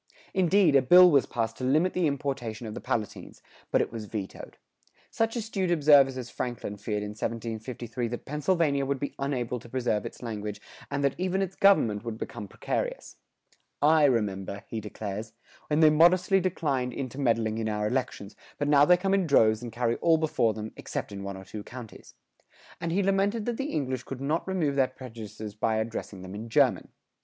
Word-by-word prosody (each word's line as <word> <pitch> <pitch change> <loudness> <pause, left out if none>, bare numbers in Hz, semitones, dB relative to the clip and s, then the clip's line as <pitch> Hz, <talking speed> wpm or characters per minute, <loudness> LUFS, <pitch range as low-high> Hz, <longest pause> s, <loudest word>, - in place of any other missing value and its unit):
Indeed, 185 -3 +4
a 135 - +7
bill 180 +7 +8
was 140 -3 +4
passed 115 -1 -2
to - - -7
limit 155 +8 +2
the 180 -3 +2
importation 135 -5 -3
of 110 - -6
the - - -7
Palatines, 110 -3 -4 0.3
but - - +3
it - - -2
was 115 -2 -6
vetoed.[109:3] 100 -2 -6 0.6
Such 225 +1 0
astute 210 -5 -2
observers 145 -5 +5
as 125 -2 -6
Franklin 120 -4 -4
feared 105 0 -3
in 105 - -4
1753 115 +2 -4
that 120 +1 -6
Pennsylvania 150 -1 +1
would 135 0 -1
be 140 - -4
unable 125 -3 -2
to 120 - -14
preserve 120 -4 -1
its - - -8
language 105 -3 -5 0.3
and 140 - -2
that 140 -1 +2
even 190 +1 0
its 190 0 -5
government 115 - +4
would 115 -2 -5
become 105 -2 -6
precarious.[109:4] 145 - -5
"I 155 -1 +6
remember," 100 -5 -1
he 110 - -4
declares, 105 +1 -6 0.3
"when 150 +1 +1
they 155 -1 +7
modestly 180 +5 +5
declined 145 -9 -1
intermeddling 115 -5 -1
in 110 -1 -1
our 105 0 -1
elections, 115 -4 -3 0.2
but 145 - -1
now 145 -1 +6
they 180 +3 +6
come 195 +2 0
in 195 -3 +2
droves 110 -6 +4
and 120 -1 -6
carry 120 0 0
all 165 -1 +3
before 135 -9 +1
them, 110 0 -6
except - - -5
in 100 -1 -6
one 100 0 -5
or 95 - -10
two 105 - -7
counties;" 120 -2 -11 0.6
and 170 0 -3
he 195 +4 +1
lamented 200 +3 +1
that 240 -1 -2
the 275 +2 -3
English 130 -4 -2
could 130 0 -7
not 150 +7 -1
remove 165 -7 0
their 135 -2 +3
prejudices 110 -5 -9
by 110 +1 0
addressing 110 -3 -4
them 95 0 -8
in 110 +3 -7
German. - - +3
130 Hz, 190 wpm, -28 LUFS, 110-160 Hz, 0.6 s, bill